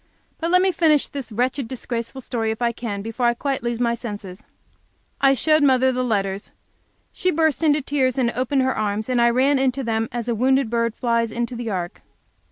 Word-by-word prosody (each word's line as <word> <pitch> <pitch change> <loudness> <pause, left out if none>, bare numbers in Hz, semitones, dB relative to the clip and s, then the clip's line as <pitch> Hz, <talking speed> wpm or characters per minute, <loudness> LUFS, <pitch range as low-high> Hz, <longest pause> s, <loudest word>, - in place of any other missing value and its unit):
But 330 - -1
let 365 +1 +5
me 380 - +3
finish 320 -4 +3
this 275 -5 -7
wretched, 250 +3 -1
disgraceful 240 +1 -4
story, 230 -2 -2
if 220 +1 -3
I 240 -1 +1
can, 215 -4 -5
before 225 +2 -1
I 240 - +2
quite 275 +2 -2
lose 235 0 -2
my 235 -1 +1
senses. 205 -5 -7 0.8
I 275 0 +5
showed 310 +5 +3
my 285 - +5
mother 260 +1 +3
the 255 0 -1
letters. 200 -4 -1 0.6
She 370 - 0
burst 320 -2 +1
into 300 -2 +3
tears 265 -3 0
and 240 -3 +2
opened 260 +3 0
her 260 0 0
arms, 215 +2 -2
and 245 -1 +2
I 235 - +5
ran 265 +3 +3
into 265 0 0
them 225 -1 -1
as 240 0 -4
a 240 - +1
wounded 260 +1 +2
bird 230 -1 0
flies 230 -2 0
into 240 +2 -3
the 235 -1 -4
ark. 180 -2 -4
240 Hz, 210 wpm, -22 LUFS, 230-270 Hz, 0.8 s, let